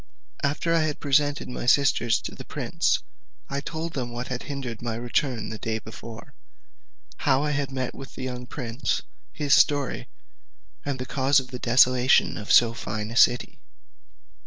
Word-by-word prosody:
After 150 +4 0
I 165 - +4
had 155 -1 -1
presented 145 0 +1
my 125 - -5
sisters 135 -4 +3
to - - -5
the - - -9
prince, - - 0 0.5
I 140 0 -1
told 160 +2 -5
them 125 -3 -3
what 120 +1 -5
had 125 -1 -3
hindered 130 -6 -5
my 115 -1 -3
return 120 0 -1
the 110 - -6
day 110 -1 -2
before, 115 +3 -10 0.8
how 135 0 +2
I 150 - 0
had 140 -2 -1
met 130 -1 -3
with 135 - -10
the 130 - -6
young 125 -1 -5
prince, 120 0 -2 0.3
his 145 -2 +1
story, 145 -3 +3 0.7
and 140 -2 -2
the 125 - -5
cause 135 +1 +3
of 130 -1 -8
the 125 - -6
desolation 125 +1 +4
of 105 - -4
so 115 -1 +6
fine 110 -1 -4
a - - -7
city. 120 0 +3
130 Hz, 170 wpm, -25 LUFS, 120-140 Hz, 0.8 s, so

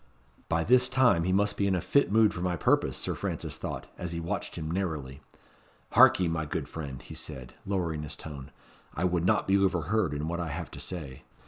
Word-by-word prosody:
"By 80 0 +2
this 125 +5 +4
time 125 -10 +4
he 90 - +1
must 100 +2 +2
be 100 - +1
in 95 - +2
a - - +1
fit 140 +10 +2
mood 110 0 +5
for 85 - -5
my 90 -1 0
purpose," 80 - +2
Sir - - -2
Francis - - -4
thought, - - -5
as 90 -1 -4
he 85 - -3
watched 85 +1 -4
him 80 -1 -4
narrowly. 75 -7 -3 0.7
"Harkye, 90 - +6
my 80 -2 -2
good - - -2
young - - -15
friend," 70 -5 -6
he - - -10
said, 65 -2 -6
lowering 85 -6 -1
his 75 - -4
tone, 70 -3 -8 0.5
"I 80 - -2
would 90 -2 +1
not - - +2
be 100 +1 +4
overheard 95 -2 +1
in 75 +2 -3
what 85 +1 -2
I 85 - -2
have 80 +1 -5
to - - -9
say. 75 -8 -6
85 Hz, 220 wpm, -29 LUFS, 80-95 Hz, 0.7 s, Harkye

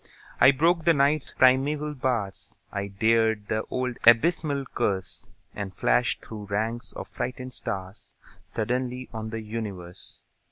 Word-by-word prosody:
I 130 - +8
broke 165 +5 +3
the 170 -1 +5
Night's 140 +1 +2
primeval 145 +4 +3
bars, 120 -8 -3
I 100 0 -3
dared 110 +1 +1
the 110 0 0
old 125 -1 -2
abysmal 140 +3 +4
curse, 100 +4 -2 0.2
And 100 -2 -6
flashed - - +1
through 105 -2 -8
ranks 110 +4 -2
of - - -7
frightened 125 +1 -5
stars 95 -2 -6 0.3
Suddenly 125 +3 -3
on 110 0 -4
the 110 0 -4
universe! 100 -6 -7
115 Hz, 130 wpm, -26 LUFS, 105-130 Hz, 0.3 s, I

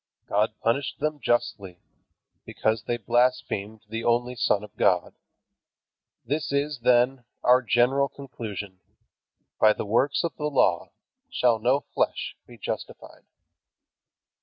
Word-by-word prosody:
God 105 +1 +1
punished 130 +4 0
them 155 -1 -1
justly, 100 -7 -1 0.7
because 110 0 -1
they 120 +2 -2
blasphemed 110 -3 0
the 115 +2 -4
only 120 +1 +1
Son 105 -3 +1
of 105 - -12
God. 90 -2 +2 1.1
This 150 +1 -2
is, 140 -1 -1
then, 125 +2 +3 0.2
our 125 +1 +6
general 125 +4 +2
conclusion: 105 -9 -8 0.8
"By 110 -1 +6
the - - -5
works 125 +10 +1
of 170 - -2
the 150 - -3
law 125 - +2 0.4
shall 120 -3 +2
no 130 +5 +2
flesh - - -1
be 120 - -14
justified." - - -7
120 Hz, 120 wpm, -26 LUFS, 110-135 Hz, 1.1 s, our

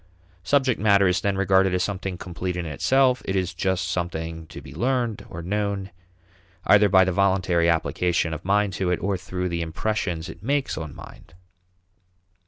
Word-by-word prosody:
Subject 130 +4 +2
matter 100 -2 +5
is 90 - +1
then 100 -1 0
regarded 95 -1 +3
as 90 - +1
something 95 -2 -3
complete 90 0 -4
in 85 - -3
itself; 130 - +2
it 95 - -2
is 95 -1 -1
just 95 0 -1
something 80 -2 -4
to - - -9
be 70 - -12
learned 120 - -1
or 85 0 -7
known, 100 +1 -2 0.7
either 105 0 +5
by 95 -1 +6
the 95 - 0
voluntary 90 -2 +2
application 85 0 0
of 80 - -6
mind 100 +1 +1
to 95 -1 -1
it 90 - +1
or 100 0 -1
through 90 0 -4
the 85 -1 -2
impressions 85 0 -2
it 85 - -10
makes 140 +5 -1
on 80 -3 -6
mind. 80 - -13
95 Hz, 175 wpm, -24 LUFS, 85-100 Hz, 0.7 s, by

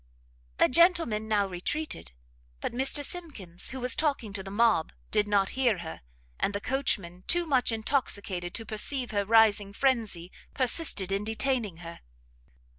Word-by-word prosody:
The - - +5
gentleman 330 -9 +3
now 210 -2 +2
retreated; 195 - -4 0.5
but - - -3
Mr 270 +3 +1
Simkins, 245 - -4
who 265 - -6
was 250 -1 +3
talking 275 -9 -1
to 200 - -3
the 195 - -8
mob, 210 -5 +2 0.2
did 210 -1 +2
not 200 -2 +2
hear 250 -6 +2
her; 165 -2 -8 0.4
and 200 - 0
the - - -1
coachman, 195 -9 -2
too 345 0 +2
much 260 -6 +2
intoxicated 205 -7 -2
to 225 - -3
perceive 240 +4 -2
her 205 -1 0
rising 210 -2 +4
frenzy, 215 -9 0 0.2
persisted 250 - +2
in 195 +1 0
detaining 220 -3 -1
her. 170 - -8
220 Hz, 150 wpm, -28 LUFS, 195-265 Hz, 0.5 s, The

